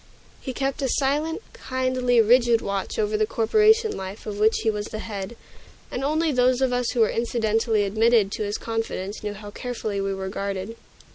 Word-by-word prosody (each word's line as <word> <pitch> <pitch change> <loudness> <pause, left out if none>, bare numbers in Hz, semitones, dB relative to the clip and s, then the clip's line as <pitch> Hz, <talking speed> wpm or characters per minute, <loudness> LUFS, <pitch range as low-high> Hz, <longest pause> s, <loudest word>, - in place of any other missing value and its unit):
He 260 - -4
kept 270 +2 -2
a 265 - 0
silent, 300 - 0
kindly, 255 -2 0
rigid 235 +1 +4
watch 200 -2 -3
over 215 0 0
the 215 0 +1
corporation 430 - +3
life 190 +2 -7
of 205 -2 -5
which 220 +1 +3
he 225 - +2
was 210 0 -4
the 215 - -6
head; 205 0 -6 0.6
and 250 - -3
only 310 +3 +1
those 250 -1 +3
of 260 -2 +1
us 245 -1 0
who 240 - +1
were 220 - +4
incidentally 225 -2 +1
admitted 215 0 +3
to 215 - -3
his 205 0 -2
confidence 225 -3 -4
knew 210 -1 -4
how 205 0 -9
carefully 220 -4 -4
we 195 0 -1
were 190 0 -4
guarded. 200 +2 -4
225 Hz, 190 wpm, -24 LUFS, 205-255 Hz, 0.6 s, rigid